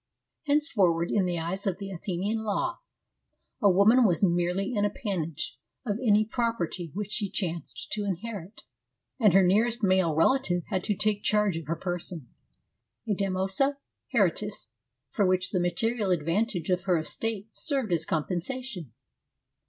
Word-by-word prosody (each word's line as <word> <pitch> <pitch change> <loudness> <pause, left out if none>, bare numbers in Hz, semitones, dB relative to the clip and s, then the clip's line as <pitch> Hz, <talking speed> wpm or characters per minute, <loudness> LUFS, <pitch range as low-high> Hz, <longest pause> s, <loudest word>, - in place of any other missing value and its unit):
Henceforward, 200 - +2
in 200 -3 +2
the 175 -1 -1
eyes 175 +5 -3
of 185 -2 0
the 195 -1 -7
Athenian 190 +4 -2
law, 220 - -2 0.8
a 205 - +5
woman 205 +7 +5
was 180 -4 +2
merely 180 +4 +1
an 205 - +1
appanage 180 - -3 0.3
of 210 -1 -2
any 215 -3 +4
property 210 -7 -2
which 210 0 -4
she 210 -2 -1
chanced 170 -5 -4
to 210 - -1
inherit, 200 0 -5 0.6
and 210 -7 +5
her 195 0 +6
nearest 220 +5 +2
male 185 -5 +3
relative 175 - +2
had 185 -3 -1
to 210 - 0
take 210 +1 0
charge 210 -4 +2
of 165 -3 -6
her 165 - -1
person 175 -6 -4 0.4
— 115 +3 -44
a 210 - +1
damnosa 195 +8 +3 0.3
hereditas 205 - 0 0.4
for 205 - +1
which 185 0 +1
the 185 - +1
material 215 +4 0
advantages 175 +2 0
of 180 - -21
her 180 -3 +3
estate 210 +6 -2
served 270 - 0
as 165 -2 +1
compensation. 180 - -3
195 Hz, 150 wpm, -27 LUFS, 175-215 Hz, 0.8 s, her